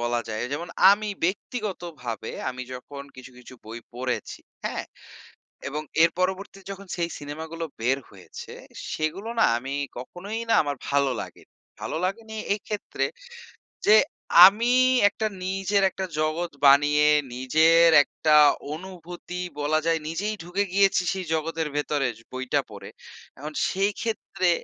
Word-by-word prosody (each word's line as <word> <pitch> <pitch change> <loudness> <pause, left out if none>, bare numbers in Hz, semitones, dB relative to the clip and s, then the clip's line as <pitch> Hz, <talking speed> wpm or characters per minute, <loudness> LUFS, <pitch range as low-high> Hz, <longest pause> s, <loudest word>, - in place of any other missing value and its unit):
বলা 120 0 0
যায় 110 0 -3
যেমন 165 +4 -4 0.2
আমি 210 +1 +2 0.2
ব্যক্তিগতভাবে 175 - -4 0.2
আমি 125 0 -5
যখন 140 +2 -9
কিছু, 130 +1 -11
কিছু 125 +1 -13
বই 115 +1 -7 0.2
পড়েছি 125 0 -3 0.3
হ্যাঁ, - - -3 0.8
এবং 150 +2 -3 0.2
এর 165 - +6
পরবর্তীতে 190 +1 -2
যখন 195 0 -9
সেই 170 -1 -1
সিনেমাগুলো 160 +3 -6 0.2
বের 130 +4 +2
হয়েছে 95 -3 -11 0.4
সেগুলো 170 +8 -3
না - - +6
আমি 135 +3 -5 0.2
কখনোই 190 - -6
না - - +4
আমার 145 -1 -2
ভালো 140 -1 +2
লাগেনি। - - -12 0.3
ভালো - - -3
লাগেনি 220 +3 -4 0.2
এইক্ষেত্রে 210 0 -3 0.8
যে, 215 - +8 0.5
আমি 230 +5 +1 0.4
একটা 220 +1 -2 0.2
নিজের 195 +1 0
একটা 190 0 -4
জগৎ 160 +3 -1
বানিয়ে 145 +2 +6 0.3
নিজের 160 +6 +5
একটা 155 +2 +1 0.4
অনুভূতি 180 +1 -8 0.2
বলা 155 +2 +2
যায় 165 -1 +2
নিজেই 200 +7 -2
ঢুকে 180 +4 -1
গিয়েছি 195 -1 +4
সেই 190 -1 -4
জগতের 160 0 -1
ভেতরে 145 -1 0
যো 115 - -18
বইটা 130 0 0
পড়ে। - - -9 0.5
এখন 150 +2 -7 0.2
সেই 195 +2 +1
ক্ষেত্রে 195 -5 -1
165 Hz, 135 wpm, -25 LUFS, 140-195 Hz, 0.8 s, যে